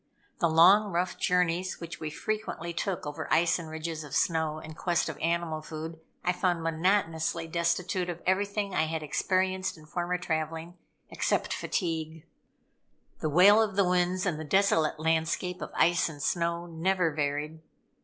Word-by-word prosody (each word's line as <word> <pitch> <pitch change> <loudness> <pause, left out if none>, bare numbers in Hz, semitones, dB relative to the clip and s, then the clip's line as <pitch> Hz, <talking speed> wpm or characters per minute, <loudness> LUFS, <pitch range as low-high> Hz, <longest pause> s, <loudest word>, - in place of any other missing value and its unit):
The 170 - +3
long, 190 +6 +6
rough 175 +1 -1
journeys 180 +1 +1
which 170 -1 -7
we 155 - -4
frequently 210 -1 -4
took 180 +1 -3
over 150 +2 -5
ice 170 +1 +3
and 165 -2 -7
ridges 160 0 -5
of 150 -1 -7
snow 160 -3 +1
in 155 0 -9
quest 170 +1 0
of 155 - -6
animal 165 -1 -1
food, 160 +1 -7 0.3
I 180 - +3
found 175 -2 0
monotonously 165 -1 0
destitute 170 +2 -1
of 170 -1 -4
everything 200 +1 0
I 160 - +2
had 160 -1 -3
experienced 185 +4 0
in 155 - -15
former 175 +3 -2
traveling, 165 0 -3 0.4
except - - 0
fatigue. 160 -3 -3 0.9
The 155 - -1
wail 195 +8 +7
of 210 -3 0
the 200 -1 +4
winds, 180 +1 +1
and 165 -5 -1
the - - -4
desolate 160 -3 +2
landscape 160 +3 0
of - - -4
ice 175 0 +3
and 150 -2 -10
snow, 170 +3 -1
never 175 +1 0
varied. 150 +1 -2
170 Hz, 160 wpm, -29 LUFS, 160-180 Hz, 0.9 s, wail